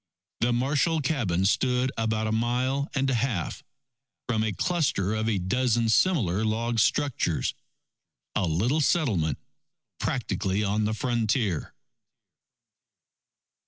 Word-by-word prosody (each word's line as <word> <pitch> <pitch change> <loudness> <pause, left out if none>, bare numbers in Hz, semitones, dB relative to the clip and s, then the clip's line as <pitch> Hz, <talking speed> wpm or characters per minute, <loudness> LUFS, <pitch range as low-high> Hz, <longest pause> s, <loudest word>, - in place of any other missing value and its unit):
The 120 +1 +2
Marshall 145 +6 +1
cabin 110 - 0
stood 125 +5 +2
about 110 -1 -1
a 110 - -1
mile 125 +5 0
and 135 0 +1
a 135 - +1
half 115 -7 -2 0.6
from 110 -3 +1
a 110 - 0
cluster 125 - 0
of 110 +1 0
a 105 - +1
dozen 115 +5 +1
similar 110 - +2
log 115 +2 0
structures, 120 - +1 0.8
a 100 -4 0
little 115 - +1
settlement 105 - +1 0.6
practically 105 -5 -1
on 105 +1 0
the 110 +1 -1
frontier. 110 - -1
115 Hz, 115 wpm, -26 LUFS, 105-130 Hz, 0.8 s, The